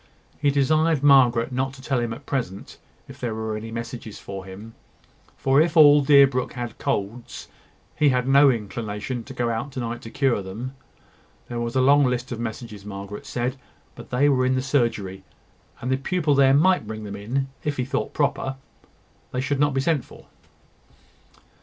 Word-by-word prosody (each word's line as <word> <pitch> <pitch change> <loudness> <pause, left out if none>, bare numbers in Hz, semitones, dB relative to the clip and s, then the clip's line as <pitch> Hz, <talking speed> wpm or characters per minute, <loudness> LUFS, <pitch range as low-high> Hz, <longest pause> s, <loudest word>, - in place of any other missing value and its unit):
He 145 - +2
desired 155 +2 +2
Margaret 130 -4 +5
not 130 +1 -1
to 135 - -13
tell 135 -3 0
him 120 -1 -2
at 125 +5 -8
present 115 -10 -4 0.3
if - - -12
there 120 -3 -3
were 110 -1 -3
any 110 +1 -6
messages 115 -1 -7
for 95 -1 -8
him; 100 +4 -10 0.6
for, 135 +2 +3
if 165 +1 +1
all 145 -1 +8
Deerbrook 140 -3 +4
had 120 -3 -6
colds, 110 +4 -3 0.5
he 150 -1 +3
had 125 -1 0
no 140 +1 +6
inclination 115 +1 -3
to 135 - -9
go 120 -1 0
out 115 +5 -3
to 130 - -5
night 120 0 -4
to 115 - -9
cure 130 -4 +1
them. 110 +8 -7 0.8
There 120 - -4
was 120 +1 -3
a 130 - +3
long 140 +2 +5
list 125 0 -2
of 120 - -4
messages, 110 -3 -6
Margaret 100 0 -8
said, 125 +2 -2 0.4
but - - -12
they 130 +4 +2
were 130 -3 +3
in 130 0 +2
the 130 - -1
surgery; 115 -9 -1 0.6
and 125 - -2
the 130 - +2
pupil 155 +2 0
there 135 -1 +5
might 180 - +3
bring 110 0 -6
them 100 -1 -6
in, 125 +7 -3
if 150 -1 -2
he 125 - -1
thought 135 - -2
proper: 135 -2 -1 0.8
they 125 - -2
should 140 +1 -1
not 145 -1 +2
be 135 - +2
sent 150 -1 +1
for. - - -16
125 Hz, 185 wpm, -24 LUFS, 115-140 Hz, 0.8 s, all